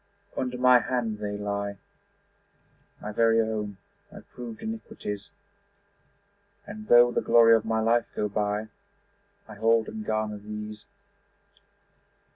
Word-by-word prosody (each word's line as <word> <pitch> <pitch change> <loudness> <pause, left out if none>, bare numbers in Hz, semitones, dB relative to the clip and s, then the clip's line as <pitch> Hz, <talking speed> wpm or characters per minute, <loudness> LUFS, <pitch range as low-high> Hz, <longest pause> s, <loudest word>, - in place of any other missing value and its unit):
Under 125 -1 -2
my 125 0 +6
hand 115 -4 -2
they 105 -1 -3
lie, 100 0 -3 1.3
My 105 - -4
very 115 +1 +3
own, 105 -3 -2 0.3
my - - -11
proved 120 -3 -10
iniquities; 210 - -6 1.4
And 215 +1 -9
though 120 0 +7
the - - 0
glory 115 -1 +6
of 110 -1 0
my 110 0 0
life 115 +1 +2
go 105 - 0
by 105 +1 -2 0.8
I 110 - -10
hold 115 +2 +2
and 220 -1 -6
garner 110 - -2
these. 105 +1 -8
110 Hz, 120 wpm, -27 LUFS, 105-120 Hz, 1.4 s, though